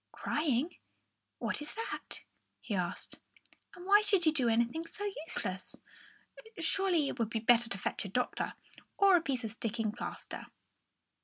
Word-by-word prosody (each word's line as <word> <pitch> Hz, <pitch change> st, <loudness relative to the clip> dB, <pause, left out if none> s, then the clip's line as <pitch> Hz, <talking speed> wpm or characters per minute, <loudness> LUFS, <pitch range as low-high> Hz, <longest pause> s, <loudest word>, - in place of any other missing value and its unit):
"Crying? 300 Hz, +1 st, 0 dB, 0.6 s
What -, -, -2 dB
is 295 Hz, -, -4 dB
that?" 455 Hz, +1 st, -3 dB, 0.4 s
he 215 Hz, -, -5 dB
asked. 180 Hz, -3 st, -2 dB, 0.6 s
"And 355 Hz, -, -10 dB
why 405 Hz, +2 st, +7 dB
should 400 Hz, -4 st, +2 dB
you 315 Hz, -, +6 dB
do 255 Hz, -6 st, +3 dB
anything 235 Hz, +7 st, +2 dB
so 410 Hz, +5 st, -5 dB, 0.2 s
useless? 185 Hz, -, -2 dB, 0.8 s
Surely, 345 Hz, -2 st, +2 dB
it 255 Hz, -, -4 dB
would 225 Hz, -2 st, +1 dB
be 230 Hz, -, -1 dB
better 235 Hz, +1 st, +5 dB
to 200 Hz, -, -3 dB
fetch -, -, -2 dB
a 195 Hz, -, -5 dB
doctor 250 Hz, +6 st, -1 dB, 0.4 s
or 395 Hz, -2 st, +7 dB
a 345 Hz, -, +5 dB
piece 265 Hz, -6 st, -1 dB
of 220 Hz, -, -3 dB
sticking 225 Hz, -1 st, -2 dB
plaster." 235 Hz, -, -6 dB
255 Hz, 155 wpm, -33 LUFS, 225-350 Hz, 0.8 s, why